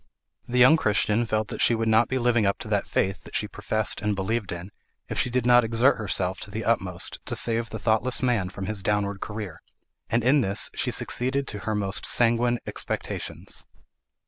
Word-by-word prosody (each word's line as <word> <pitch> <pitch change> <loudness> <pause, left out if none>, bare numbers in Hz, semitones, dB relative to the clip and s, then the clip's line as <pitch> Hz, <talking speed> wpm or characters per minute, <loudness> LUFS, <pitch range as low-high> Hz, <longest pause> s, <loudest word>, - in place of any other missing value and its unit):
The 125 - -2
young 130 +6 +7
Christian 110 -1 +1
felt 110 -1 -1
that - - -5
she 120 - +4
would 115 0 -1
not 110 +1 +4
be 130 - 0
living 120 -2 +2
up 100 -1 +1
to - - -7
that - - 0
faith 95 0 -1
that - - -11
she 105 - 0
professed 105 0 -2
and 105 0 0
believed 100 +2 -2
in, 90 +3 -7 0.4
if - - -2
she - - +1
did 125 -1 -1
not 120 0 +6
exert 115 +4 +2
herself 95 -3 -2
to - - -8
the 110 +2 -5
utmost 95 -6 0
to - - -2
save 115 -1 +1
the 110 - -6
thoughtless 110 +4 +1
man 115 -8 +1
from 95 +1 -7
his 105 0 +1
downward 100 -1 -1
career; 105 -5 -6 0.5
and 115 0 +1
in 135 +4 +4
this 100 -2 +1
she - - -1
succeeded 135 +3 0
to 105 - -5
her 110 - 0
most 100 -1 0
sanguine 120 0 +3
expectations. - - -4
110 Hz, 200 wpm, -25 LUFS, 100-120 Hz, 0.5 s, young